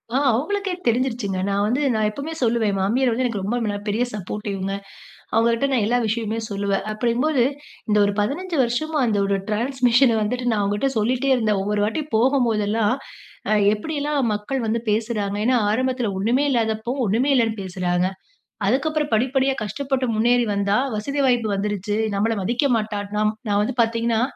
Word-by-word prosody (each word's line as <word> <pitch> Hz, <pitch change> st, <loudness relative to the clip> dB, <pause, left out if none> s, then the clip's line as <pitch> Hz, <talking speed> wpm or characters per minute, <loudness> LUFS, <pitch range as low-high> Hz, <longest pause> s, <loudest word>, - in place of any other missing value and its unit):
ஆ -, -, +4 dB
அவங்களுக்கே 390 Hz, -, -1 dB
தெரிஞ்சுருச்சுங்க. 235 Hz, -5 st, 0 dB
நான் 200 Hz, 0 st, +1 dB
வந்து 250 Hz, +7 st, 0 dB
நான் 215 Hz, -1 st, +1 dB
எப்பவுமே 280 Hz, +9 st, -6 dB
சொல்லுவேன், 230 Hz, -2 st, +2 dB
என் 195 Hz, -, -2 dB
மாமியார் 240 Hz, +7 st, +2 dB
வந்து 240 Hz, +3 st, 0 dB
எனக்கு 225 Hz, -5 st, -2 dB
ரொம்ப 220 Hz, +5 st, -1 dB
மென 205 Hz, -1 st, -1 dB
பெரிய 215 Hz, +4 st, +1 dB
சப்போர்டிவ்ங்க. 195 Hz, -1 st, -4 dB, 0.6 s
அவங்கட்ட 230 Hz, +3 st, +2 dB
நான் 250 Hz, -5 st, +2 dB
எல்லா 240 Hz, +3 st, +2 dB
விஷயமுமே 220 Hz, 0 st, -2 dB
சொல்லுவேன். 200 Hz, -1 st, -1 dB
அப்டிங்கும்போது, 245 Hz, +5 st, +1 dB, 0.5 s
இந்த 210 Hz, -, +3 dB
ஒரு 200 Hz, -, 0 dB
15 325 Hz, -, -2 dB
வருஷமா, 305 Hz, +7 st, -1 dB
அந்த 215 Hz, -2 st, +1 dB
ஒரு 195 Hz, 0 st, +1 dB
ட்ரான்ஸ்மிஷன 245 Hz, +1 st, +3 dB
வந்துட்டு, 245 Hz, +4 st, -2 dB
நான் 215 Hz, -2 st, +1 dB
அவங்கட்ட 205 Hz, +7 st, 0 dB
சொல்லிட்டே 250 Hz, +5 st, +1 dB
இருந்தேன். 215 Hz, -5 st, +1 dB
ஒவ்வொரு 205 Hz, +1 st, 0 dB
வாட்டி 230 Hz, +9 st, -2 dB
போகும்போதெல்லாம், 225 Hz, -3 st, +2 dB, 0.6 s
அ -, -, +5 dB, 0.2 s
எப்படியெல்லாம் 290 Hz, +6 st, -2 dB
மக்கள் 230 Hz, +4 st, -3 dB
வந்து 230 Hz, +1 st, 0 dB
பேசுறாங்க. 210 Hz, -2 st, -1 dB
ஏன்னா, 250 Hz, +1 st, +3 dB
ஆரம்பத்துல 250 Hz, -1 st, 0 dB
ஒண்ணுமே 240 Hz, +8 st, +2 dB
இல்லாதப்போ 225 Hz, -1 st, 0 dB, 0.2 s
ஒண்ணுமே 245 Hz, +8 st, +2 dB
இல்லைன்னு 225 Hz, -3 st, +1 dB
பேசுறாங்க, 180 Hz, -1 st, -1 dB, 0.6 s
அதுக்கப்புறம் 300 Hz, +6 st, 0 dB
படிப்படியா 265 Hz, +3 st, +1 dB
கஷ்டப்பட்டு 265 Hz, +5 st, -2 dB
முன்னேறி 240 Hz, +2 st, +3 dB
வந்தா, 200 Hz, 0 st, +1 dB, 0.2 s
"வசதி 280 Hz, +7 st, -3 dB
வாய்ப்பு 245 Hz, -3 st, +2 dB
வந்துருச்சு 205 Hz, 0 st, -2 dB, 0.2 s
நம்மள 220 Hz, +3 st, +1 dB
மதிக்க 240 Hz, +8 st, 0 dB
மாட்டா", 215 Hz, -1 st, -3 dB, 0.2 s
நம் 215 Hz, 0 st, +2 dB
நான் 205 Hz, -1 st, +2 dB
வந்து 255 Hz, -, -2 dB
பார்த்தீங்கன்னா, 230 Hz, 0 st, +1 dB
230 Hz, 160 wpm, -22 LUFS, 210-255 Hz, 0.6 s, அ